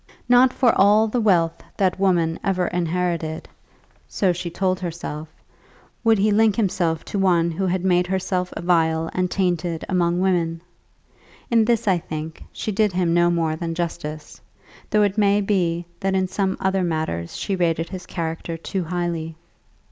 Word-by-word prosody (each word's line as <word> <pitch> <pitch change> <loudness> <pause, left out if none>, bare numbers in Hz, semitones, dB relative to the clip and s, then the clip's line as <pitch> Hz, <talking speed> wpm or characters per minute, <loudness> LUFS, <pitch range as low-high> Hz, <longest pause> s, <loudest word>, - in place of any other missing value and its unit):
Not 245 +1 +6
for 250 -2 +3
all 210 +3 +5
the 235 +2 -1
wealth 170 -6 +2 0.2
that 190 -1 +1
woman 170 -4 +2
ever 185 -2 +1
inherited, 170 -2 -2 0.6
so 190 -3 +1
she 175 0 -5
told 185 +2 -1
herself, 160 -3 -5 0.7
would 225 -1 +4
he 210 +2 +2
link 215 0 +4
himself 175 -6 0
to 200 - -3
one 170 -3 +3
who 190 +4 -2
had 185 0 -1
made 180 -1 +3
herself 185 -1 -1
vile 165 -2 +1
and 185 0 0
tainted 175 -3 -1
among 175 -1 +1
women! 170 -3 0 0.9
In 230 -2 +4
this, 230 -2 +1
I 185 -3 +3
think, 160 0 -7
she 215 - -4
did 210 -1 +1
him 175 -2 +1
no 175 0 +4
more 165 -2 0
than 165 0 -4
justice, 160 -3 -5 0.5
though 210 0 +3
it 205 +1 0
may 205 0 +4
be 175 -4 0
that 195 0 0
in 190 -1 +1
some 190 0 -1
other 190 0 +1
matters 155 - -2
she 200 - -2
rated 165 -2 0
his 185 -1 -8
character 165 0 -4
too 180 +2 -4
highly. 170 -2 -3
180 Hz, 165 wpm, -22 LUFS, 165-195 Hz, 0.9 s, Not